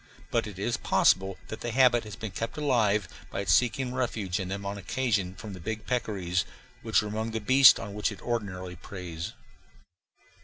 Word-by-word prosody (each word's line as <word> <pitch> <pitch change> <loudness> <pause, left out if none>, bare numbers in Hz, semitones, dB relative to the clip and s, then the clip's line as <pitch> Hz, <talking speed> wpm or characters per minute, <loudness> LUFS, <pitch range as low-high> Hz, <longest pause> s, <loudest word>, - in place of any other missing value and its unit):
But - - +1
it - - -9
is - - -1
possible 95 0 +3
that 110 - -6
the 120 - -3
habit 120 -1 +4
has 105 -2 -7
been 110 0 -6
kept 115 +8 -4
alive 110 - +2 0.2
by - - -3
its 95 -3 +2
seeking 125 +1 +2
refuge 110 -8 -1
in 95 - -3
them 100 +1 -4
on 100 +1 -4
occasion 100 -4 -1
from 105 0 -8
the 90 - -8
big 110 +5 -5
peccaries, 95 -8 -1 0.4
which - - +2
are - - -4
among 110 +2 -2
the 110 0 -2
beasts 130 +3 +7
on 100 - -6
which 105 +2 0
it 100 - -9
ordinarily 95 -6 -3
preys. 85 -2 -7
105 Hz, 190 wpm, -28 LUFS, 95-120 Hz, 0.4 s, beasts